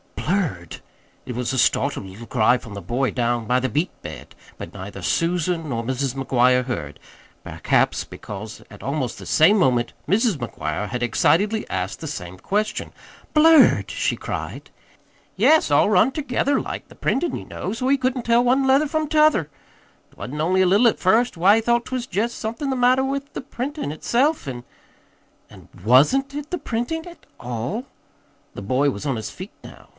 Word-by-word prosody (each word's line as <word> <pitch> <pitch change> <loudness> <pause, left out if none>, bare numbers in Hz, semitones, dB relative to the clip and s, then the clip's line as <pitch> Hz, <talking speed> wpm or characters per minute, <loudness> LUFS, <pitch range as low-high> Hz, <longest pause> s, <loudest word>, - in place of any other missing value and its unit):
"Blurred?" 150 - -2 0.5
It 125 - -5
was 125 +1 -2
a 130 - 0
startled 140 -7 +1
little 100 +5 -10
cry 115 +2 +3
from 115 -4 -11
the 100 - -6
boy 125 +4 -1
down 120 -2 -1
by 125 +3 +2
the 130 0 -1
beet 155 +6 -1
bed; - - -9 0.2
but - - -8
neither - - -8
Susan 170 -1 0
nor 115 -3 -2
Mrs. 130 +1 -2
McGuire 125 -1 +2
heard 80 - -5 0.4
perhaps - - 0
because 105 +2 -9
at 100 - -12
almost 135 -3 -3
the - - -10
same 180 +7 +5
moment 125 -6 +2
Mrs. 210 -2 +2
McGuire 105 - -4
had 125 +2 -3
excitedly 205 - +1
asked - - -3
the 160 - -6
same 95 - -7
question. 210 - -2 0.4
"Blurred?" 315 -1 +5
she - - -1
cried. - - -6 0.6
"Yes; 315 - +4
all 145 +7 +4
run 215 +5 +4
tergether 280 0 0
like - - -6
the - - -16
printin', 315 +5 -1
ye - - -6
know 190 - -5
so 250 +3 -2
he 280 - +4
couldn't 255 -1 -1
tell 235 +1 +3
one 260 +2 +2
letter 270 +3 +4
from 310 +1 -1
t'other. 305 - +3 0.6
'T - - -25
wa'n't 150 +4 -5
only 185 +4 +2
a - - +4
little 200 +7 +4
at 230 - +1
first. 225 +7 +2
Why, 190 +5 +5
he - - +1
thought 235 +1 +1
't - - -12
was 245 -1 -3
jest 235 +2 -2
somethin' 230 +6 -3
the - - 0
matter 255 +1 +3
with 275 +1 -3
the - - -5
printin' 275 - -5
itself; 250 - 0
an' 120 -2 -6 0.4
" - - -38
"And - - -15 0.2
WASN'T 155 - +4
it 295 +1 -6
the 360 - -1
printing 255 +8 -3
at 345 -3 -13
ALL?" 125 - -4 0.7
The - - -6
boy 130 +7 +2
was 100 -3 -5
on 135 -4 -1
his 110 - -5
feet 185 +4 -9
now. - - -14
180 Hz, 185 wpm, -22 LUFS, -, 0.7 s, same